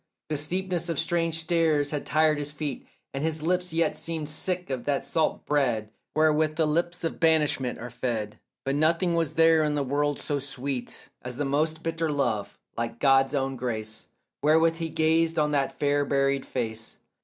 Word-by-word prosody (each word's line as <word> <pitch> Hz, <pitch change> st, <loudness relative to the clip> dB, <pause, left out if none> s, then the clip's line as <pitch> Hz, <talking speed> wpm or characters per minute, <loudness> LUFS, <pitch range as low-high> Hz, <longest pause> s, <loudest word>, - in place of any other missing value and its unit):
The 155 Hz, -, 0 dB
steepness 175 Hz, +3 st, -2 dB
of 165 Hz, -, -1 dB
strange 165 Hz, 0 st, 0 dB
stairs 160 Hz, -3 st, +2 dB
had 150 Hz, -2 st, -3 dB
tired 155 Hz, -1 st, +3 dB
his 145 Hz, 0 st, -3 dB
feet, 145 Hz, -3 st, -5 dB, 0.3 s
And 135 Hz, +1 st, -3 dB
his 160 Hz, -1 st, -1 dB
lips 180 Hz, +1 st, 0 dB
yet 165 Hz, +1 st, +1 dB
seemed 160 Hz, -2 st, -3 dB
sick 180 Hz, +1 st, -2 dB
of 130 Hz, -2 st, -3 dB
that 145 Hz, -1 st, 0 dB
salt 160 Hz, -1 st, 0 dB
bread 120 Hz, -7 st, 0 dB, 0.2 s
Wherewith 155 Hz, 0 st, +3 dB
the 160 Hz, -, +2 dB
lips 170 Hz, +3 st, -1 dB
of 165 Hz, -, -2 dB
banishment 150 Hz, -6 st, +2 dB
are 120 Hz, +1 st, -7 dB
fed; 115 Hz, -4 st, -3 dB, 0.3 s
But 135 Hz, -, 0 dB
nothing 165 Hz, +4 st, +2 dB
was 165 Hz, -3 st, 0 dB
there 165 Hz, -1 st, +5 dB
in 150 Hz, -1 st, 0 dB
the 145 Hz, -, 0 dB
world 145 Hz, +2 st, 0 dB
so 145 Hz, -2 st, -2 dB
sweet 135 Hz, -2 st, -4 dB
As 125 Hz, 0 st, -6 dB
the 145 Hz, +3 st, -2 dB
most 155 Hz, +3 st, 0 dB
bitter 165 Hz, -1 st, -1 dB
love, 120 Hz, -8 st, -1 dB, 0.2 s
like 115 Hz, 0 st, -3 dB
God's 135 Hz, +1 st, +4 dB
own 135 Hz, -1 st, -1 dB
grace, 110 Hz, -3 st, -4 dB, 0.3 s
Wherewith 160 Hz, +2 st, +4 dB
he 165 Hz, -1 st, -3 dB
gazed 160 Hz, +1 st, +2 dB
on 150 Hz, -1 st, +2 dB
that 140 Hz, -2 st, 0 dB
fair 145 Hz, 0 st, +2 dB
buried 135 Hz, -1 st, +1 dB
face. 110 Hz, -3 st, -4 dB
150 Hz, 180 wpm, -27 LUFS, 135-160 Hz, 0.3 s, there